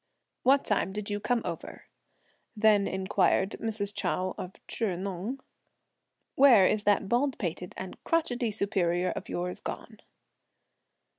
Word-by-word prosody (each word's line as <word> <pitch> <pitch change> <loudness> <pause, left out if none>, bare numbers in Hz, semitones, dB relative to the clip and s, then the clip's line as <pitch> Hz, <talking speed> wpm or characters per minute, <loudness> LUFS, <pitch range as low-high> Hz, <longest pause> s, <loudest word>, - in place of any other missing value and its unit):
"What 275 +2 +4
time 195 -2 0
did 210 0 -4
you 205 - -1
come 235 +2 0
over?" 170 -2 -6 0.7
then 210 -2 +4
inquired 190 +1 +1
Mrs. 210 -2 -2
Chou 185 -2 -1
of 185 +1 -7
Chih 205 -6 -2
Neng. 195 +7 -4 0.9
"Where 250 -8 +7
is 210 +2 +1
that 205 -1 +3
bald 255 +5 +1
pated 180 -2 -4
and 190 -1 -8
crotchety 255 -8 0
superior 180 -4 0
of - - -6
yours 180 +1 -3
gone?" - - -7
205 Hz, 130 wpm, -29 LUFS, 185-225 Hz, 0.9 s, Where